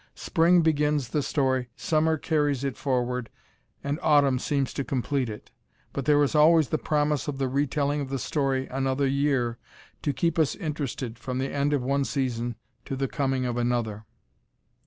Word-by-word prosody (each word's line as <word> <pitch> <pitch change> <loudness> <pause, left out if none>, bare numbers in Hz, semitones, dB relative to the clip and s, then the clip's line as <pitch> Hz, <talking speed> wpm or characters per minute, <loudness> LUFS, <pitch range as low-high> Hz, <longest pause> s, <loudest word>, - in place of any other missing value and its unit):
Spring 170 +2 +3
begins 150 -4 +1
the 150 - 0
story, 130 -3 0
summer 160 0 +1
carries 145 -4 0
it 135 -4 -2
forward, 125 -2 -1 0.5
and 145 +3 -2
autumn 140 -4 +4
seems 140 -1 -1
to 140 - -2
complete 135 -1 -1
it, 105 - -9 0.4
but 140 - -3
there 145 -1 +4
is 140 - 0
always 155 -1 +5
the 155 - 0
promise 150 -1 0
of 145 -2 -3
the 135 -1 0
retelling 145 +2 0
of 135 - -5
the 135 - -2
story 135 -1 -1
another 135 +1 0
year 135 -4 +1 0.4
to 145 - 0
keep 165 +5 0
us 155 - +2
interested 140 - -4
from 125 0 -4
the 135 +1 -2
end 140 +1 +1
of 140 -4 +1
one 140 +2 +1
season 120 -4 -2 0.3
to 135 - -4
the 135 0 -1
coming 135 -2 -1
of 120 -1 -2
another. 120 -3 -1
140 Hz, 175 wpm, -26 LUFS, 130-150 Hz, 0.5 s, always